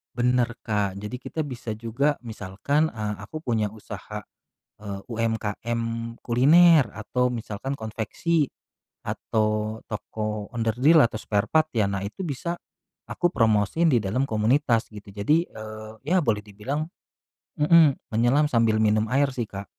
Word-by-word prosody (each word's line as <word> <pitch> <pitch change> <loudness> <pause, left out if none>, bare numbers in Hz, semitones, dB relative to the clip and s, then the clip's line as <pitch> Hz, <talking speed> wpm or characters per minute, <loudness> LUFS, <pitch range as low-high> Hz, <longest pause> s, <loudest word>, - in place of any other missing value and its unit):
Bener, 125 -1 +1
Kak, 100 -3 -1
jadi 105 +4 -5
kita 150 +5 -7
bisa 125 -6 -4
juga 120 +7 -1
misalkan, 115 +7 -1
eee, 105 -2 -3
aku 155 +9 -7
punya 110 -7 -1
usaha, 105 -1 -8 0.6
eee, 100 -2 -5
UMKM 115 0 -2 0.4
kuliner 150 +3 +6
atau 125 +3 -1
misalkan 120 +3 -4
konveksi, 125 +8 -1 0.6
atau 110 0 -1
toko 105 0 -4
onderdil 125 +8 +4
atau 110 -2 +1
spare 105 -1 -1
part 155 0 +4
ya 105 -3 +3
nah 100 -1 -2
itu 150 - -7
bisa, 170 +2 -3 0.6
aku 175 -1 +1
promosiin 115 +9 +3
di 120 - +4
dalam 105 +7 0
komunitas 115 +2 +2
gitu. 105 -1 -10
Jadi, 150 - +1
eee, 110 0 -8
ya 185 +3 +3
boleh 110 -6 +1
dibilang 130 +10 -4 0.7
mhm, 155 -2 +6 0.2
menyelam 120 +7 +3
sambil 115 -3 +3
minum 110 0 +2
air 140 +1 +3
sih 120 -4 -3
Kak. 100 0 -7
115 Hz, 135 wpm, -25 LUFS, 105-140 Hz, 0.7 s, kuliner